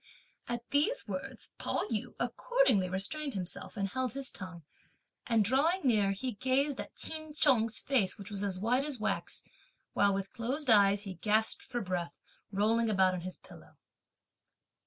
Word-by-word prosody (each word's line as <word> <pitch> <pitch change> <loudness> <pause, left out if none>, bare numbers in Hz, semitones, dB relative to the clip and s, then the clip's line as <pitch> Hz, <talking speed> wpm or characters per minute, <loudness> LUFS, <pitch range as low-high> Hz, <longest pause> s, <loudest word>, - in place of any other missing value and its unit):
At 240 0 -4
these 310 +14 +1
words, - - -6
Pao - - 0
yü 215 -2 -3
accordingly 480 - +2
restrained 265 +10 -2
himself, 185 +3 -4
and 195 -1 0
held 255 +3 -2
his 275 -1 -4
tongue; 180 -3 -8 0.6
and 225 -3 +3
drawing 300 - +3
near, 215 -7 +3
he 230 +6 -3
gazed 265 +5 0
at - - -11
Ch'in 315 -1 -2
Chung's 235 -7 +4
face, 230 -10 +1
which 200 -1 -8
was 200 -1 -3
as 200 -2 -1
white 245 +6 +2
as 290 -4 -4
wax, 215 0 -2 0.5
while 200 0 +4
with 195 0 -4
closed 255 +3 0
eyes, 200 -1 +5
he 195 -2 -6
gasped 215 +5 +1
for 240 - -4
breath, 180 -3 -3 0.4
rolling 220 +3 +2
about 190 -3 +3
on 180 - -3
his 185 +1 -6
pillow. - - -16
220 Hz, 160 wpm, -32 LUFS, 195-265 Hz, 0.6 s, eyes